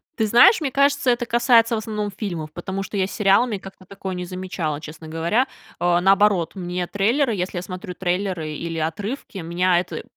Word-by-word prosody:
Ты 220 Hz, -, +1 dB
знаешь, 245 Hz, -, +7 dB
мне 275 Hz, -3 st, -1 dB
кажется, 280 Hz, -1 st, +3 dB
это 240 Hz, 0 st, 0 dB
касается 235 Hz, -1 st, +4 dB
в -, -, -1 dB
основном 210 Hz, -1 st, -3 dB
фильмов. 170 Hz, -8 st, -5 dB
Потому 190 Hz, +3 st, -4 dB
что 200 Hz, +2 st, -5 dB
я 190 Hz, 0 st, +1 dB
с -, -, -10 dB
сериалами 210 Hz, +2 st, +3 dB
как-то 195 Hz, 0 st, -13 dB
такое 190 Hz, -1 st, -6 dB
не 180 Hz, 0 st, -4 dB
замечала, 180 Hz, -5 st, -4 dB
честно 155 Hz, +1 st, -10 dB
говоря. 170 Hz, +11 st, 0 dB, 0.3 s
А, 175 Hz, 0 st, +2 dB
наоборот, 195 Hz, -2 st, +3 dB
мне 180 Hz, -1 st, -3 dB
трейлеры, 230 Hz, +4 st, +1 dB
если 180 Hz, 0 st, -3 dB
я -, -, -5 dB
смотрю 185 Hz, +1 st, -7 dB
трейлеры 180 Hz, -3 st, -2 dB
или 165 Hz, +2 st, -4 dB
отрывки, 200 Hz, -, -4 dB
меня 175 Hz, +1 st, +1 dB
это 180 Hz, -, -5 dB
190 Hz, 190 wpm, -22 LUFS, 175-220 Hz, 0.3 s, знаешь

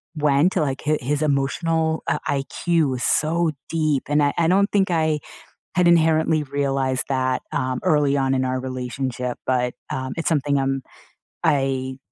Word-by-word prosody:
went 150 Hz, +4 st, +3 dB
to, 180 Hz, -, +1 dB
like, 135 Hz, -2 st, -2 dB
hi 155 Hz, 0 st, +2 dB
his 145 Hz, +4 st, -1 dB
emotional, 160 Hz, +3 st, 0 dB
uh, -, -, +1 dB
IQ 150 Hz, +2 st, 0 dB
was 125 Hz, -1 st, -3 dB
so 165 Hz, +1 st, +2 dB, 0.2 s
deep, 155 Hz, -4 st, 0 dB
and 150 Hz, 0 st, +3 dB
I 145 Hz, -, +2 dB
I 165 Hz, -, +3 dB
don't 200 Hz, +4 st, +3 dB
think 195 Hz, -2 st, +2 dB
I 155 Hz, -2 st, +1 dB, 0.6 s
had 180 Hz, -1 st, +4 dB
inherently 160 Hz, -2 st, +3 dB
realized 135 Hz, -2 st, -1 dB
that, 130 Hz, -1 st, 0 dB
um, 130 Hz, -2 st, -1 dB
early 150 Hz, -6 st, +3 dB
on 135 Hz, -1 st, +1 dB
in 130 Hz, 0 st, 0 dB
our 130 Hz, 0 st, -1 dB
relationship, 125 Hz, -1 st, -4 dB
but, 125 Hz, -1 st, 0 dB, 0.2 s
um, 130 Hz, 0 st, -3 dB
it's 165 Hz, -, 0 dB
something 145 Hz, -2 st, +1 dB
I'm 135 Hz, 0 st, -1 dB, 0.6 s
I 130 Hz, -2 st, 0 dB
140 Hz, 165 wpm, -22 LUFS, 130-160 Hz, 0.6 s, had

